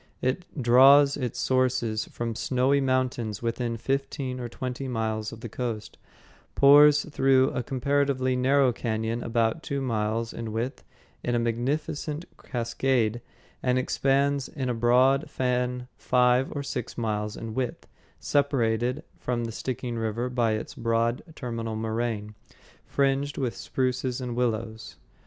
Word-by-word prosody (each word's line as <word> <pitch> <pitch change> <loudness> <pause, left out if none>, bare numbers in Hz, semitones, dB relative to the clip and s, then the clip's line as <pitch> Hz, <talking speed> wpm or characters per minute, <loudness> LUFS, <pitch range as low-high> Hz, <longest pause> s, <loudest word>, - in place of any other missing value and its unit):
It 130 +8 -1
draws 135 +3 +7
its 125 -4 -3
sources 130 -4 +1
from 115 -1 -4
snowy 130 +4 +2
mountains 125 -5 -1
within 115 0 -2
fifteen 135 0 -2
or 120 -1 -5
twenty 130 +2 -5
miles 110 -3 -2
of 115 - -10
the 120 - -5
coast, 115 -1 -5 0.6
pours 145 +1 +7
through 135 -3 +3
a - - -2
comparatively 135 0 0
narrow 130 0 +3
cañon 110 0 -2
about 115 +5 0
two 140 -3 -3
miles 115 -2 -1
in 115 -1 -5
width 115 +4 -3 0.4
in 120 - 0
a - - +3
magnificent 145 +7 -2 0.2
cascade, 120 -1 0 0.4
and 125 0 +1
expands 140 +1 +1
in 130 -3 -4
a - - +1
broad 130 +5 +3
fan 125 -1 -1
five 125 +1 +3
or 145 - -4
six 125 -4 -5
miles 105 -2 -2
in 115 -1 -6
width, 125 0 -3 0.3
separated 125 -1 +1 0.2
from 120 -1 -2
the 115 - -4
Stickeen 120 0 -4
River 115 +3 -2
by 120 -3 +1
its 110 - -4
broad 115 -1 0
terminal 115 -4 -4
moraine, 110 -1 -2 0.5
fringed 140 +1 0
with 130 -4 -1
spruces 130 -1 -1
and 125 -2 -4
willows. 110 -3 -2
125 Hz, 135 wpm, -27 LUFS, 115-135 Hz, 0.6 s, draws